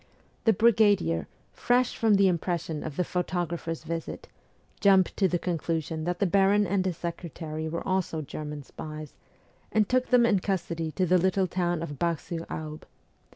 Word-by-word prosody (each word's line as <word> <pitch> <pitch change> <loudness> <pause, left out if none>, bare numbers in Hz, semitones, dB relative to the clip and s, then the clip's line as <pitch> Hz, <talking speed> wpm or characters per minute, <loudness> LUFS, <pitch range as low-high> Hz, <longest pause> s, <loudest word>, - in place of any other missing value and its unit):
The 225 - +6
brigadier, 205 - +3 0.3
fresh 245 0 +1
from 220 -2 +3
the 195 0 +5
impression 170 -3 -1
of 155 -3 -5
the 180 - +1
photo 180 0 -1
grapher's 165 -1 -5
visit, 165 +1 -5 0.5
jumped 195 -3 +4
to 195 - +4
the 180 - 0
conclusion 160 -2 -2
that 175 0 -1
the 200 - +1
baron 200 +2 +4
and 190 0 +1
his 180 -3 -2
secretary 160 -2 -5
were 170 +1 -4
also 185 -4 -1
German 150 0 -6
spies, 155 +1 -8 0.6
and 215 -2 +3
took 255 +2 +1
them 245 -2 +5
in 205 -4 +3
custody 170 -4 -2
to 185 - +1
the 180 +1 +4
little 190 +2 +2
town 175 -2 -1
of 145 -4 -6
Bar 170 -1 +1
sur 165 +2 -6
Aube. 155 0 -6
175 Hz, 170 wpm, -27 LUFS, 160-195 Hz, 0.6 s, The